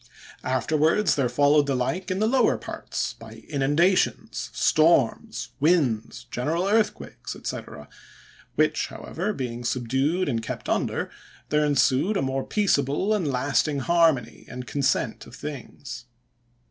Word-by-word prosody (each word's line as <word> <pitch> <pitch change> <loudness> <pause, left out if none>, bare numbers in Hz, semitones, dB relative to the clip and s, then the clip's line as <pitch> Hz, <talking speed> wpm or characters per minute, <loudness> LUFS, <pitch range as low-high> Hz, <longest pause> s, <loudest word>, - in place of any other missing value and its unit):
Afterwards 155 - +2
there 135 -4 +1
followed 145 +1 +4
the 140 - +1
like 165 +9 -2
in 185 - -1
the 215 - +2
lower 260 +4 +3
parts, - - -4
by - - -13
inundations, 150 +6 +1
storms, 155 -6 +2
winds, 135 -7 +1
general 160 +9 -1
earthquakes, 215 +1 -1
&c., - - -2 1.0
which, - - +2
however, 210 - -4
being 120 - -4
subdued 135 +9 0
and 115 -5 0
kept - - -6
under, - - -1 0.4
there 150 0 +2
ensued 145 +6 +2
a - - 0
more 135 0 -1
peaceable 190 -1 +1
and 195 -7 0
lasting 140 +2 +1
harmony, 160 -7 +2
and 125 0 -7
consent 140 +1 -1
of - - -12
things. 130 -4 -8
145 Hz, 125 wpm, -25 LUFS, 130-170 Hz, 1.0 s, followed